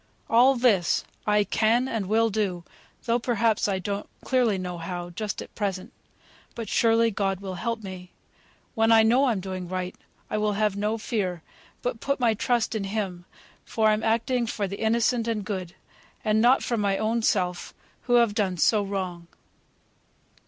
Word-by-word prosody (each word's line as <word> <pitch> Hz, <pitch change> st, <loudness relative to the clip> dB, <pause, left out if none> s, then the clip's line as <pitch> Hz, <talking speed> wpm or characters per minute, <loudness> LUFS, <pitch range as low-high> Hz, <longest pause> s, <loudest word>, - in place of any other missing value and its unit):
All 250 Hz, +4 st, +6 dB
this 225 Hz, -8 st, +2 dB, 0.2 s
I 210 Hz, 0 st, +4 dB
can 230 Hz, +5 st, +2 dB
and 220 Hz, -6 st, -3 dB
will 225 Hz, +2 st, +2 dB
do, 195 Hz, -5 st, -1 dB, 0.4 s
though 235 Hz, +1 st, +2 dB
perhaps 230 Hz, -3 st, +1 dB
I 195 Hz, -2 st, 0 dB
don't 200 Hz, +2 st, -4 dB
clearly 245 Hz, -6 st, +2 dB
know 180 Hz, -2 st, -5 dB
how, 175 Hz, +1 st, -5 dB
just 210 Hz, +4 st, -4 dB
at -, -, -16 dB
present. 195 Hz, -3 st, -3 dB, 0.6 s
But 230 Hz, -3 st, -5 dB
surely 230 Hz, 0 st, +3 dB
God 195 Hz, -2 st, -1 dB
will 195 Hz, -1 st, -6 dB
help 230 Hz, +3 st, -3 dB
me. 185 Hz, -2 st, -8 dB, 0.6 s
When 225 Hz, -1 st, +2 dB
I 225 Hz, -1 st, +7 dB
know 245 Hz, +5 st, +4 dB
I'm 230 Hz, -7 st, +1 dB
doing 185 Hz, -1 st, -5 dB
right, 185 Hz, 0 st, -3 dB, 0.3 s
I 215 Hz, -, -2 dB
will 210 Hz, 0 st, +1 dB
have 210 Hz, -1 st, +1 dB
no 210 Hz, +2 st, -1 dB
fear, 190 Hz, -7 st, -3 dB, 0.4 s
but 245 Hz, -2 st, -2 dB
put 280 Hz, +3 st, -1 dB
my 235 Hz, -3 st, +3 dB
trust 235 Hz, +2 st, 0 dB
in 215 Hz, -3 st, -2 dB
Him; 195 Hz, -4 st, -4 dB, 0.4 s
for 220 Hz, -1 st, +1 dB
I'm 215 Hz, 0 st, +2 dB
acting 235 Hz, +2 st, +1 dB
for 205 Hz, -3 st, -2 dB
the 200 Hz, +1 st, -6 dB
innocent 230 Hz, +1 st, +1 dB
and 215 Hz, -3 st, -2 dB
good, 185 Hz, -4 st, -5 dB, 0.5 s
and 215 Hz, 0 st, +3 dB
not 250 Hz, +3 st, +4 dB
for 235 Hz, -, -1 dB
my 200 Hz, -2 st, +1 dB
own 225 Hz, +2 st, 0 dB
self, 180 Hz, -4 st, 0 dB, 0.3 s
who 245 Hz, -, +3 dB
have 235 Hz, -3 st, +4 dB
done 195 Hz, -4 st, 0 dB
so 210 Hz, +5 st, +3 dB
wrong. 185 Hz, -4 st, -4 dB
215 Hz, 175 wpm, -26 LUFS, 190-230 Hz, 0.6 s, I